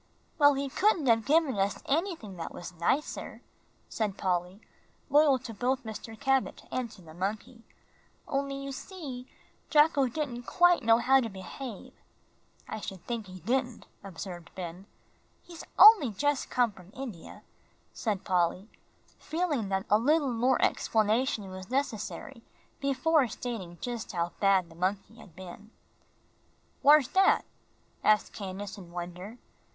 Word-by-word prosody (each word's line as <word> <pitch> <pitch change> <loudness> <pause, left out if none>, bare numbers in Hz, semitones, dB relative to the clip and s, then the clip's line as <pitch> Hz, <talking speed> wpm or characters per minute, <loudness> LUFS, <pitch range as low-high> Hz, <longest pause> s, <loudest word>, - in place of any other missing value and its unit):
"Well, 285 -1 +6
he 275 +1 -2
couldn't 365 +2 +2
have 225 -2 +3
given 295 -7 +3
us 195 +1 -1
anything 315 - -2
that 165 - -5
was 175 - -8
nicer," 175 - -2 0.4
said 210 -3 -2
Polly, 180 +1 -1 0.5
loyal 290 -2 +5
to 245 -2 -8
both 255 +5 -1
Mr. 220 0 -8
Cabot 270 -1 0
and 255 -2 -2
to 190 - -15
the 160 -1 -13
monkey, 210 +7 -4 0.7
"only 275 0 -2
you 275 0 -5
see, 270 -5 -8 0.4
Jocko 295 -3 +4
didn't 285 +1 -3
know 240 - -6
quite 350 +5 +3
how 235 +4 +5
to 235 -3 -2
behave." 205 +3 -8 0.7
"I 220 - -5
shouldn't 190 -3 -8
think 230 -4 -4
he 185 -1 -11
did," 245 +4 -1 0.2
observed 175 -2 -8
Ben. 180 +1 -7 0.6
"He's 340 -2 -10
only 405 - +9
just 290 +7 -1
come 245 -3 +2
from 185 -2 -16
India," 240 -11 -8 0.5
said 210 -4 -2
Polly, 180 +3 0 0.5
feeling 310 - -2
that 190 0 -1
a 210 - +4
little 285 +1 +2
more 245 +3 +2
explanation 220 0 +1
was 185 +1 -9
necessary 240 -3 -3 0.4
before 275 +1 +2
stating 220 -8 -6
just 240 -3 -5
how 170 -1 -1
bad 195 -3 +3
the 165 - -16
monkey 195 +5 -2
had 195 -8 -15
been. 190 +3 -11 1.1
"Whar's 290 -1 +6
dat?" 385 +5 +3 0.6
asked 215 0 +3
Candace, 200 0 -6
in 180 -3 -12
wonder. 180 +5 -7
230 Hz, 140 wpm, -29 LUFS, 190-275 Hz, 1.1 s, only